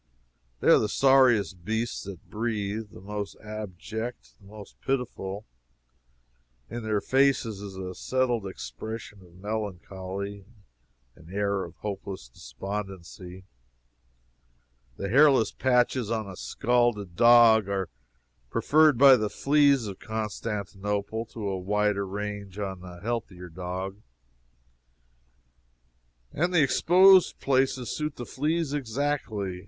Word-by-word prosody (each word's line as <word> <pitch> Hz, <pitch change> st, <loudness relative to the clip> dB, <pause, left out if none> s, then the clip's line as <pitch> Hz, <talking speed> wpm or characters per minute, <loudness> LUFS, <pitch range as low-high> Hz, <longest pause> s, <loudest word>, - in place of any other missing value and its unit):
They -, -, +3 dB
are -, -, +8 dB
the 105 Hz, -, 0 dB
sorriest 120 Hz, -9 st, +4 dB
beasts 110 Hz, +4 st, -2 dB
that 95 Hz, -3 st, -9 dB
breathe 110 Hz, -1 st, -3 dB
the -, -, -13 dB
most 105 Hz, 0 st, -5 dB
abject 110 Hz, +2 st, -6 dB
the 100 Hz, -, -17 dB
most 105 Hz, 0 st, -13 dB
pitiful. 115 Hz, -6 st, -3 dB, 1.3 s
In 120 Hz, +1 st, -4 dB
their 110 Hz, -2 st, 0 dB
faces 130 Hz, -5 st, +2 dB
is 100 Hz, -2 st, -8 dB
a 95 Hz, -1 st, -5 dB
settled 120 Hz, -2 st, -1 dB
expression 105 Hz, -, -7 dB
of 85 Hz, -2 st, -18 dB
melancholy, 100 Hz, -1 st, -5 dB, 0.7 s
an 80 Hz, -, -16 dB
air 100 Hz, -1 st, 0 dB
of 85 Hz, -, -10 dB
hopeless 100 Hz, -8 st, -6 dB
despondency. 95 Hz, +7 st, -7 dB, 1.5 s
The 100 Hz, -, -3 dB
hairless 135 Hz, -1 st, +5 dB
patches 125 Hz, -2 st, +1 dB
on 110 Hz, -2 st, -2 dB
a 95 Hz, -, -8 dB
scalded 120 Hz, -5 st, 0 dB
dog 115 Hz, -2 st, +6 dB
are 95 Hz, -2 st, -1 dB, 0.6 s
preferred 155 Hz, -, +4 dB
by 135 Hz, +1 st, +9 dB
the 105 Hz, -2 st, -1 dB
fleas 140 Hz, -2 st, +3 dB
of 100 Hz, -2 st, -7 dB
Constantinople 105 Hz, 0 st, -3 dB
to 110 Hz, -3 st, -6 dB
a 95 Hz, -1 st, -2 dB
wider 105 Hz, +1 st, 0 dB
range 100 Hz, 0 st, -5 dB
on 95 Hz, -3 st, -4 dB
a 90 Hz, -1 st, -11 dB
healthier 100 Hz, -5 st, -4 dB
dog; 95 Hz, +3 st, -5 dB, 2.3 s
and 175 Hz, +5 st, 0 dB
the 170 Hz, -4 st, +4 dB
exposed 185 Hz, +6 st, +5 dB
places 130 Hz, -2 st, +1 dB
suit 150 Hz, -1 st, -3 dB
the 120 Hz, -, -6 dB
fleas 155 Hz, +3 st, -1 dB
exactly. 115 Hz, -8 st, -2 dB
105 Hz, 115 wpm, -27 LUFS, 95-120 Hz, 2.3 s, by